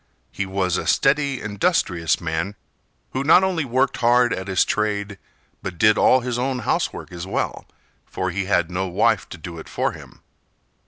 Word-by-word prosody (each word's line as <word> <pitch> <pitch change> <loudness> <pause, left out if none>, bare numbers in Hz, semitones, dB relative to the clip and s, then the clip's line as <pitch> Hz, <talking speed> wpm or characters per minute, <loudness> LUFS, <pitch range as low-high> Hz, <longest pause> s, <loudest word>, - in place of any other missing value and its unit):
He 100 - -3
was 95 -2 0
a - - -4
steady, 140 -1 +2
industrious 100 - 0
man, 85 +4 -3 0.6
who 130 - -2
not 165 +6 +6
only 185 -4 0
worked 130 +1 +1
hard 120 +1 +3
at 95 +1 -5
his 95 -2 +2
trade, 100 -1 -2 0.4
but 90 -2 -6
did 105 +5 +5
all 130 +2 +4
his 120 -1 -3
own 130 +1 -1
housework - - -1
as 90 +1 -7
well, - - -3 0.4
for 95 0 -3
he 95 +2 -2
had 90 -3 +1
no 95 +2 -1
wife 90 - +1
to - - -8
do 85 -1 -8
it - - -11
for - - -1
him. - - -13
100 Hz, 175 wpm, -22 LUFS, 90-125 Hz, 0.6 s, not